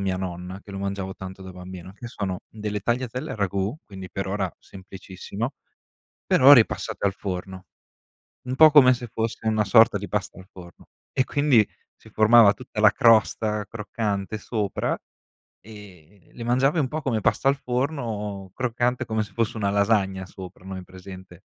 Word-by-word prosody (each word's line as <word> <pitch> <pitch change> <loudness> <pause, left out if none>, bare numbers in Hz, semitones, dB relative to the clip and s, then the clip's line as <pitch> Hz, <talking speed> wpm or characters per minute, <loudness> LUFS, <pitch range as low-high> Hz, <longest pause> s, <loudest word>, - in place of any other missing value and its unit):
mia 95 -1 -1
nonna, 90 +1 -6
che 100 - -12
lo 95 - -5
mangiavo 100 -1 -4
tanto 95 0 -9
da 95 0 -9
bambino, 90 0 -10
che 120 +4 -9
sono 95 -5 -4
delle 105 -1 -4
tagliatelle 125 +5 -2
al - - -5
ragù, 100 0 -1
quindi 95 -2 -10
per 95 - -4
ora 95 -2 -2
semplicissimo, 95 +4 -7 0.7
però 135 +2 +7
ripassate 105 -5 +2
al 95 - +1
forno. 95 -1 -6 0.8
Un 125 +1 -4
po' 155 +2 +8
come 135 -4 +8
se 120 -1 -4
fosse 110 0 -4
una 110 -1 +2
sorta 110 -1 +5
di 100 - -7
pasta 105 -2 -3
al 95 - -13
forno 90 -2 -14 0.3
e 130 - +2
quindi 140 -7 +3 0.3
si - - -19
formava 110 -1 +6
tutta 120 -4 -7
la 105 -1 +7
crosta 110 -1 +3
croccante 105 -2 -3
sopra 105 -1 -2 0.6
e 100 -4 -15
le 120 - -8
mangiavi 130 +6 +2
un 135 -4 0
po' 155 +3 -4
come 120 -6 -1
pasta 135 - +1
al 140 - +4
forno, 120 - -3
croccante 125 0 -1
come 110 -1 -1
se 105 - -12
fosse 115 0 -1
una 100 -3 -1
lasagna 100 -2 +1
sopra, 95 0 -12
no 95 - -7
hai 95 - -7
presente 95 0 -12
105 Hz, 170 wpm, -24 LUFS, 95-120 Hz, 0.8 s, po